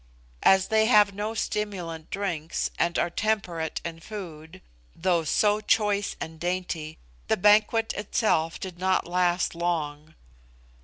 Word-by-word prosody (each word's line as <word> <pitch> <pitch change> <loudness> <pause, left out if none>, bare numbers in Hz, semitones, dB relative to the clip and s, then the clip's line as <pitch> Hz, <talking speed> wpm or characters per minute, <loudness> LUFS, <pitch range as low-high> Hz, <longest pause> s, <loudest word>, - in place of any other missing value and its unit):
As 190 0 +4
they 220 0 +3
have 210 -4 +5
no 210 +3 -3
stimulant 180 -8 -3
drinks, 170 -5 -2
and 170 0 +1
are 175 - 0
temperate 175 -6 -1
in 165 -1 -5
food, 170 -3 -9 0.3
though 175 -1 +1
so 210 +7 +2
choice 205 -1 +1
and 160 0 -7
dainty, 175 -3 -3 0.3
the - - +2
banquet 215 +3 +4
itself 195 -6 0
did 180 -2 -7
not 185 0 +1
last 175 0 +1
long. 155 -3 -3
180 Hz, 125 wpm, -26 LUFS, 165-210 Hz, 0.3 s, have